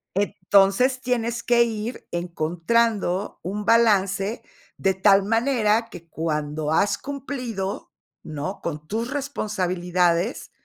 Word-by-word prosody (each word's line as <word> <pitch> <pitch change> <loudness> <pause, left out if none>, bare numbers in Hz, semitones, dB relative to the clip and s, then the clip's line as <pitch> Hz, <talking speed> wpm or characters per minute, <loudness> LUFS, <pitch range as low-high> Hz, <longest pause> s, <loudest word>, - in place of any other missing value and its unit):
Entonces, 205 +5 +3
tienes 235 -2 -1
que 235 0 +4
ir 225 +1 -5
encontrando 175 +4 0
un 205 +4 -4
balance 205 -2 +2 0.3
de 190 0 +1
tal 195 +1 +5
manera 225 0 +1
que 170 -1 -11
cuando 150 -1 -2
has 200 +5 +2
cumplido, 250 -8 -5 0.3
¿no? 155 +5 -5
Con 150 -2 -5
tus 230 +6 -3
responsabilidades, 185 -8 -1
200 Hz, 100 wpm, -24 LUFS, 175-235 Hz, 0.3 s, tal